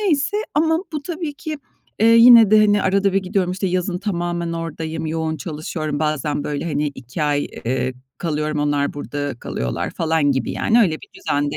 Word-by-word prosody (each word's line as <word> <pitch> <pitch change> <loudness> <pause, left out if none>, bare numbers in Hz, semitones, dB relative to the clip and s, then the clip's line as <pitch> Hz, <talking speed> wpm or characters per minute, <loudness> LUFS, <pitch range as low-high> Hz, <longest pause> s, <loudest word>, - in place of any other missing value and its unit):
Neyse 380 0 +1 0.2
ama 320 +2 +3
bu, 300 - -3
tabii 325 -2 -4
ki, 305 +1 -6 0.4
eee, 225 - +5
yine 230 -2 +8
de, 215 - +7
hani, 205 -1 +3
arada 195 0 +2
bir 195 - +3
gidiyorum, 185 -1 0
işte, 190 +1 -2
yazın 180 0 -1
tamamen 175 -3 -2
oradayım 160 -1 -4
yoğun 160 0 -2
çalışıyorum 155 -1 -4
bazen, 150 -1 -1
böyle, 145 +1 -3
hani, 150 -2 -1
2 130 +5 -6
ay, 145 -1 +1 0.2
eee, 130 +1 -1 0.2
kalıyorum. 155 -2 -2
Onlar, 145 -1 0
burada 145 -1 -4
kalıyorlar 65 - -3
falan 160 -3 +1
gibi, 130 -3 -2
yani, 235 +2 +3
öyle 175 -8 +3
bir - - -11
düzende 145 0 -1
165 Hz, 175 wpm, -20 LUFS, 150-205 Hz, 0.4 s, yine